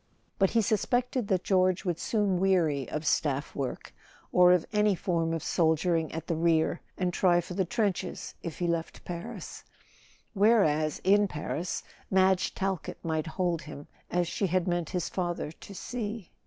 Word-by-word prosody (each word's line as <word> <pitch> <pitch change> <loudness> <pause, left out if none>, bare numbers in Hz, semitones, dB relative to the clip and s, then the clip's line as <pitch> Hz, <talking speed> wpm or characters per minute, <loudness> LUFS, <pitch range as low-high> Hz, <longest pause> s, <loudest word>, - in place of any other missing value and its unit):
But 195 -1 +4
he 230 -1 +2
suspected 245 +3 0
that 185 -3 +1
George 185 -1 +2
would 175 -2 -1
soon 205 -5 +1
weary 170 -8 +2
of 155 +1 -4
staff 145 -2 0
work, 135 -3 -4 0.4
or 180 0 +6
of 180 -2 +3
any 210 -1 +3
form 165 -2 0
of 165 -2 -2
soldiering 165 0 +1
at 160 0 -5
the 170 - -1
rear, 165 0 +2 0.2
and 180 -1 0
try 175 -2 +4
for 175 +1 -5
the 190 0 0
trenches 205 0 -2
if 165 -3 -6
he 175 - -1
left 170 -1 -2
Paris; 170 -1 -7 0.7
whereas, 195 -8 +3
in 205 +2 +4
Paris, 165 +1 -3 0.3
Madge 190 -1 +3
Talkett 190 -4 -2
might 160 -1 -1
hold 175 0 -1
him—as 170 +3 -5
she 195 +3 -1
had 185 0 0
meant 175 -2 -1
his 180 -2 -2
father 175 -4 -3
to 195 +4 -12
see. 215 -2 -5
180 Hz, 160 wpm, -29 LUFS, 165-195 Hz, 0.7 s, or